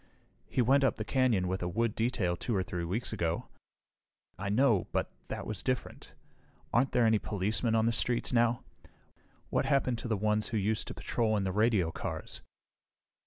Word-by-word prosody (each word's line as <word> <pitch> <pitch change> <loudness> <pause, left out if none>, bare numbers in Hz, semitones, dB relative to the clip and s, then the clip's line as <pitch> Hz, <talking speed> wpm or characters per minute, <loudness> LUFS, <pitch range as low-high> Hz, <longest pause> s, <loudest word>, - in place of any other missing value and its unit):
"He 125 - +2
went 135 +4 +4
up 135 - +2
the 110 - -4
canyon 120 -9 +2
with 95 +1 -1
the 90 - -2
wood 115 +3 0
detail 110 -7 0
2 115 +5 -2
or 95 - +1
3 90 -2 -4
weeks 105 +8 -2
ago." 85 -5 -2 0.9
"I 100 +1 -4
know 110 -2 +3
but - - -1 0.2
that - - -5
was 105 -3 -3
different. 130 -1 -3 0.6
Aren't 130 +3 +3
there 120 - +3
any 110 -1 +4
policemen 105 +4 -1
on 110 0 +3
the 115 - +3
streets 120 +2 0
now? 120 0 +2 0.9
What - - +1
happened 130 -4 +2
to - - -5
the 110 -2 0
ones 105 +1 +1
who 115 - -2
used 105 +2 0
to - - -6
patrol 110 -2 0
in 100 - 0
the 95 - -1
radio 105 -4 +2
cars?" - - -5
110 Hz, 185 wpm, -31 LUFS, 95-120 Hz, 0.9 s, went